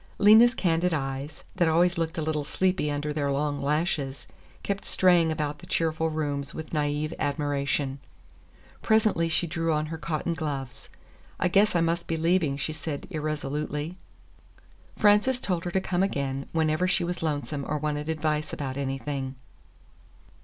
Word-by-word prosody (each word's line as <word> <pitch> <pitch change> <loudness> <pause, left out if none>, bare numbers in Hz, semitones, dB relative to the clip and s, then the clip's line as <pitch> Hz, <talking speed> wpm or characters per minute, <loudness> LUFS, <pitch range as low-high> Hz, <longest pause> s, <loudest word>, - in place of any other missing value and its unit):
Lena's 220 +4 +7
candid 170 -1 +1
eyes, 135 +1 -4
that 170 - +3
always 175 +3 +3
looked 165 -1 -2
a 160 - -1
little 150 -1 -1
sleepy 185 0 0
under 145 +1 -2
their 145 -2 0
long 145 0 -1
lashes, 145 -2 -1 0.4
kept 200 0 -2
straying 175 -3 +4
about 150 -1 -2
the - - -13
cheerful 160 0 0
rooms 145 -3 -3
with 160 -1 -7
naïve 150 0 -1
admiration. 140 -1 -1 0.8
Presently 215 -7 +3
she 165 - +1
drew 165 0 -1
on 155 0 +1
her 160 - -5
cotton 155 +2 -2
gloves. 140 -5 -5 0.5
"I 180 - +2
guess 200 +2 +4
I 170 - +4
must 165 +1 0
be 165 - -1
leaving," 165 -3 +2
she 155 +2 -3
said 155 -2 -5
irresolutely. 150 0 -3 1.0
Frances 210 +5 +4
told 180 -7 -2
her 175 - -2
to 190 - +2
come 180 -1 -1
again, 140 -7 -1
whenever 160 +2 +1
she 180 0 +1
was 175 +1 -3
lonesome 145 -3 -2
or 150 - 0
wanted 150 +1 -2
advice 155 -1 -1
about 135 -2 -4
anything. 135 0 -3
155 Hz, 155 wpm, -27 LUFS, 145-170 Hz, 1.0 s, Lena's